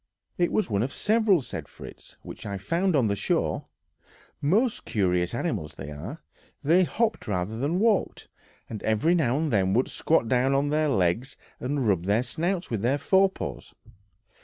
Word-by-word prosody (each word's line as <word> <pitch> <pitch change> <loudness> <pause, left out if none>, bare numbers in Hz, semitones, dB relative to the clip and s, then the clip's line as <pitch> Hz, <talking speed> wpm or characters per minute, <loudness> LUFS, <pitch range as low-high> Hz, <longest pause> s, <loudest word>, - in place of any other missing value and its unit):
"It 175 -1 +1
was 215 - +1
one 100 -3 0
of 130 +4 -1
several," 210 - +2
said - - -6
Fritz, - - -13
"which - - -9
I 100 -1 -4
found 170 - 0
on 130 -5 +3
the 100 -1 +1
shore; - - -1 0.7
most 215 - +1
curious 90 -2 0
animals 105 - -3
they 70 - -8
are; 85 - -8 0.4
they 170 +6 +4
hopped 225 - -1
rather 100 +1 -2
than 145 +7 0
walked, 215 0 +1 0.4
and 110 - -7
every 110 +10 +2
now 140 -7 +2
and 155 -3 -1
then 95 -1 +2
would 125 - +2
squat 155 -7 +1
down 130 +3 +2
on 140 +1 +1
their 155 0 +2
legs 105 +4 0 0.2
and 135 -1 -1
rub 90 -4 +1
their 105 +5 +2
snouts 175 +7 -2
with 110 -4 -1
their 125 +5 +2
fore 190 +6 +3
paws. - - -7
135 Hz, 175 wpm, -26 LUFS, 105-170 Hz, 0.7 s, they